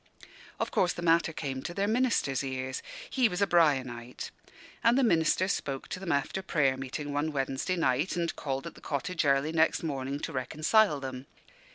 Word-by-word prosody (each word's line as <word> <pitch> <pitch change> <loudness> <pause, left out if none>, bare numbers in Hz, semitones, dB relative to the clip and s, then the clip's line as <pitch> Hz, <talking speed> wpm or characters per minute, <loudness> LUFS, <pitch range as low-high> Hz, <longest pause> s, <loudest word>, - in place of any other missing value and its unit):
Of - - -1
course 180 - +2
the 175 - -6
matter 165 -1 +3
came 135 -4 -4
to 175 - -6
their 200 0 +1
minister's 220 - +1
ears 130 -1 -3 0.3
he 255 -4 +2
was 180 - -3
a 200 - +4
"Brianite" 130 -9 +1 0.5
and 230 +3 +5
the 270 - +4
minister 175 -3 +3
spoke 135 -8 -2
to - - -4
them 185 -3 -3
after 140 +7 0
prayer 150 -8 +2
meeting, 135 +2 -5
one 150 +2 0
Wednesday 135 +5 -1
night, 150 +1 +1
and 170 -1 -1
called 135 -2 -3
at 170 - -6
the - - -16
cottage 155 +4 -2
early 140 +2 +3
next 160 +1 +2
morning, 140 -2 -3
to - - -4
reconcile 155 - +2
them. 130 0 -6
150 Hz, 185 wpm, -29 LUFS, 135-175 Hz, 0.5 s, and